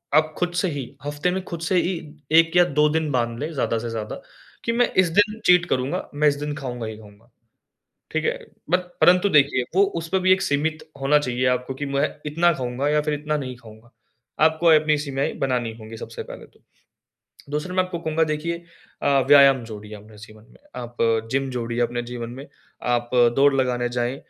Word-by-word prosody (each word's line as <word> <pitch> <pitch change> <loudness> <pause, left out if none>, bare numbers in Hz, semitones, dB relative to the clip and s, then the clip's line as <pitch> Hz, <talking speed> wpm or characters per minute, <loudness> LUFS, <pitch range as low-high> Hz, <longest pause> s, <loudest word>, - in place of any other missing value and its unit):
आप 155 0 +3
खुद 175 0 -1
से 190 - +1
ही 140 -2 -4 0.2
हफ़्ते 145 +5 -1
में 190 0 -3
खुद 170 -2 -6
से 175 +2 0
ही 185 - -1 0.4
1 165 +1 +5
या 175 - +8 0.2
2 150 - +6
दिन 155 -1 -1
बाँध 120 -2 -1
लें 150 +3 -3
ज़्यादा 125 -5 0
से 120 +1 -5
ज़्यादा, 110 -1 -4 0.5
कि 230 - +1
मैं 245 +1 +2
इस 185 -2 +5
दिन 215 +1 +2
चीट 180 -1 +5
करूँगा, 130 +1 -1
मैं 150 +1 +3
इस 145 - +3
दिन 150 0 -4
खाऊँगा 125 -4 -5
ही 110 -1 -7
खाऊँगा। 110 +2 -17 0.8
ठीक - - -1
है? - - +2 0.4
बत 180 0 0
परंतु 180 +3 +5
देखिए, 140 -4 +4
वो 195 - +6 0.2
उसपे 165 +4 -1
भी 185 0 +4
एक 190 - +2
सीमित 155 +2 -1 0.2
होना 145 +2 +4
चाहिए 125 -2 -1
आपको 125 +1 -1
कि 145 +2 -5
मैं 140 +2 +1 0.2
इतना 165 +4 +3
खाऊँगा 130 +1 -2
या 150 0 +3
फिर 150 0 -1
इतना 150 +1 -2
नहीं 130 -3 -5
खाऊँगा, 115 0 -16 0.5
आपको 160 +2 +3
अपनी 155 -1 +5
सीमाएँ 140 -2 -2
बनानी 125 -4 -1
होगी 110 +1 -9
सबसे - - -7
पहले - - -10
तो। - - -28 0.9
दूसरा 150 +5 -3
मैं 185 - +3
आपको 180 -2 -5
कहूँगा 160 0 +1
देखिए 155 +2 -2 0.5
अ, - - +1 0.2
व्यायाम 140 -3 +7
जोड़िए 105 -1 -9
अपने 105 +1 -15
जीवन 110 0 -14
में, - - -20 0.2
आप 120 -1 -7 0.4
जिम 135 0 0
जोड़िए 120 -1 -3
अपने 120 0 -1
जीवन 120 -1 -6
में, 135 +4 -9 0.4
आप 120 -1 0 0.3
दौड़ 140 +1 +5
लगाने 125 -2 0
जाएँ 120 +1 -2
140 Hz, 200 wpm, -23 LUFS, 120-160 Hz, 0.9 s, या